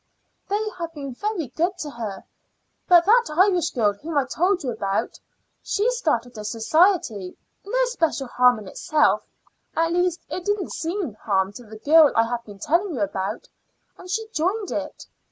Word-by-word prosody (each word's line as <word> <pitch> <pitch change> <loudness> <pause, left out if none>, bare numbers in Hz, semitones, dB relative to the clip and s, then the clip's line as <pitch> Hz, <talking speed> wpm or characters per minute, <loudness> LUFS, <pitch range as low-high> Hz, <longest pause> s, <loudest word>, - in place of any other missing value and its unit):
"They 420 +2 0
have 335 -1 -4
been 275 -3 -6
very 375 - -3
good 345 +8 -1
to 300 -3 -5
her; 220 -5 -6 0.6
but 345 -1 +6
that 470 +4 +5
Irish 360 -3 +4
girl 215 -5 +1
whom 300 +9 -5
I 280 - +3
told 360 +4 0
you 255 - -1
about, 200 -3 -2 0.4
she 430 +5 0
started 250 - -1
a - - -6
society 225 - +1 0.3
no - - +1
special 330 - -1
harm 250 -1 +4
in 210 -2 -9
itself 300 +8 +2 0.5
at 330 +1 +1
least 355 -1 +1
it 365 - -5
didn't 410 -2 -1
seem 335 - -3
harm 195 -2 -1
to 245 +3 -11
the 220 0 -11
girl 300 +5 +6
I 225 - +5
have 235 0 -3
been 205 -2 -11
telling 335 - 0
you 235 - -3
about, 195 +2 -3 0.5
and 365 - -13
she 445 +3 -2
joined 385 +6 -1
it. - - -5
315 Hz, 170 wpm, -23 LUFS, 230-370 Hz, 0.6 s, but